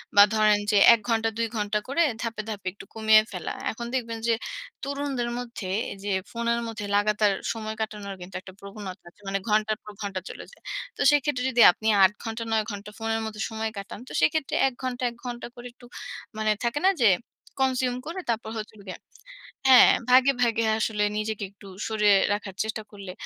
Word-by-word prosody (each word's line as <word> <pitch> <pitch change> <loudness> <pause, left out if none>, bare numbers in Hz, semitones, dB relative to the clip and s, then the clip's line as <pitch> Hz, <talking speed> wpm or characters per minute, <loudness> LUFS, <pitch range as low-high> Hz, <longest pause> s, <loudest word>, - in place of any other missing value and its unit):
বা 205 - +10
ধরেন 215 -1 +4
যে 210 - +4 0.2
১ 230 - +2
ঘণ্টা, 225 0 +2
২ 230 - +1
ঘণ্টা 210 0 0
করে 280 +6 +1 0.2
ধাপ্‌ 230 -2 -4
ধাপে 200 -4 -6
একটু - - -12
কমিয়ে 220 -1 +6
ফেলা। 180 -3 -4 0.2
এখন 235 +2 -6
দেখবেন 230 -3 -2
যে 230 - +4 0.5
তরুণদের 275 -3 -2
মধ্যে 235 -6 -6 0.3
যে 205 - -3 0.2
ফোনের 235 0 0
মধ্যে 225 -2 -5
লাগাতার 210 0 +3 0.2
সময় 220 -1 -5
কাটানোর 205 -2 -4
কিন্তু 180 +1 -10
একটা 190 0 -12
প্রবণতা 200 -1 -9
আছে। 190 - -27
মানে 195 0 0
ঘন্টার 215 0 +2
পর 210 - -9
ঘন্টা 195 -2 -3
চলে - - -8
যায়। - - -20 0.3
তো - - -3
সেক্ষেত্রে 290 -3 +1
যদি 245 -2 +3
আপনি 220 +5 -5 0.2
৮ 190 - +6
ঘন্টা, 225 0 -4
৯ 220 -1 +2
ঘন্টা 205 0 -7
ফোনের 225 0 -1
মদ্ধে 220 -1 -6
সময় 220 0 -3
কাটান, 200 0 -7
তো - - -11
সেক্ষেত্রে 275 - +1
১ 265 - -3
ঘণ্টা, 255 -1 -3
১ 235 - -15
ঘণ্টা 240 -1 -5
করে 245 0 -9
একটু, 245 - -17 0.5
মানে 215 0 +1
থাকে 285 +5 0
না - - +7
যে 220 - +7 0.5
consume 255 -1 0
করে 340 +3 -4
তারপর 225 -1 -1
হচ্ছে 215 0 -6
হলো 205 - -15
গিয়ে, 185 - -7 0.7
হ্যাঁ, 260 -1 +9 0.2
ভাগে, 260 +2 +6
ভাগে 230 -1 +2
আসলে 215 -1 0 0.2
নিজেকে 215 -1 -3
একটু 200 0 -17 0.2
সরিয়ে 210 -2 +4 0.2
রাখার 205 -2 -3
চেষ্টা 220 0 -4
করলে 200 -3 -9
220 Hz, 190 wpm, -26 LUFS, 205-235 Hz, 0.7 s, বা